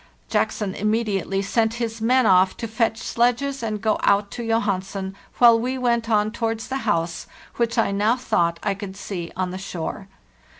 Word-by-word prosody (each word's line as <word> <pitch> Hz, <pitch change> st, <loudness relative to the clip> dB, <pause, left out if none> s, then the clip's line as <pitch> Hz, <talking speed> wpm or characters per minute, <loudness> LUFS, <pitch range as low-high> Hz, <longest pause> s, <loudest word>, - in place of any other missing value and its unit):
Jackson 200 Hz, -3 st, 0 dB
immediately 205 Hz, -2 st, 0 dB
sent 225 Hz, +3 st, +1 dB
his 230 Hz, -1 st, -4 dB
men 250 Hz, +2 st, +3 dB
off 185 Hz, -1 st, +4 dB
to 230 Hz, -, -4 dB
fetch 225 Hz, 0 st, 0 dB
sledges 245 Hz, +5 st, 0 dB
and 215 Hz, -2 st, -3 dB
go 215 Hz, -1 st, +2 dB
out 200 Hz, 0 st, +2 dB
to 240 Hz, -, -5 dB
Johansen, 195 Hz, -4 st, -1 dB, 0.2 s
while 235 Hz, -2 st, +7 dB
we 255 Hz, +3 st, -2 dB
went 235 Hz, -2 st, 0 dB
on 210 Hz, -1 st, +2 dB
towards 225 Hz, -1 st, -3 dB
the 265 Hz, -, -1 dB
house, 170 Hz, -3 st, -1 dB, 0.3 s
which 235 Hz, 0 st, 0 dB
I 225 Hz, -, +2 dB
now 210 Hz, +4 st, +2 dB
thought 170 Hz, -9 st, 0 dB
I 205 Hz, -, +1 dB
could 195 Hz, -1 st, -8 dB
see 175 Hz, -4 st, -5 dB
on 185 Hz, -1 st, -2 dB
the 185 Hz, -, -5 dB
shore. 190 Hz, +1 st, -5 dB
215 Hz, 175 wpm, -23 LUFS, 195-235 Hz, 0.3 s, while